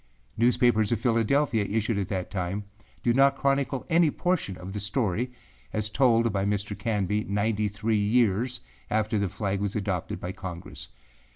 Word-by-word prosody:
Newspapers 120 -2 +3
of 115 - +1
Philadelphia, 115 0 +2
issued 110 +1 0
at 95 - -2
that 95 -3 -3
time, 95 +1 -2 0.4
did 120 -1 +2
not 135 +1 +5
chronicle 135 -1 0
any 170 -2 +4
portion 165 - -1
of 90 +2 -8
the 105 - -3
story 110 +3 -1 0.4
as 110 0 -1
told 115 -3 +3
by 95 -1 0
Mr. 105 +1 -1
Canby 105 0 -1
ninety 105 +1 0
three 105 +2 0
years 120 +2 +2 0.3
after 110 0 +1
the 100 -2 0
flag 100 0 -2
was 100 -1 -2
adopted 95 -5 -2
by 90 - -4
Congress. 90 -3 -7
105 Hz, 160 wpm, -27 LUFS, 100-120 Hz, 0.4 s, not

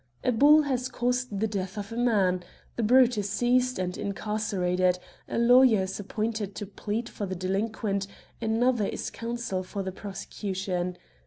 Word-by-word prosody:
A 250 - +3
bull 295 +6 +6
has 255 -3 -1
caused 245 -4 -1
the - - +3
death 195 -2 -3
of 200 0 -5
a - - -5
man. 200 -7 +2 0.3
The - - -1
brute 245 0 +5
is 205 0 -2
seized 250 +3 +2
and 180 -1 -2
incarcer 210 -1 -2
ated; 180 0 +2 0.3
a - - -2
lawyer 235 -3 +6
is 190 +2 -4
appointed 210 0 -3
to 205 - -4
plead 210 +3 -4
for 205 -3 -5
the 185 - -3
delinquent; 195 +2 -1 0.3
another 225 -1 +2
is - - -4
counsel 230 -5 -3
for 195 +2 -5
the 190 - -3
prosecution. 190 -2 -4
210 Hz, 165 wpm, -27 LUFS, 190-240 Hz, 0.3 s, bull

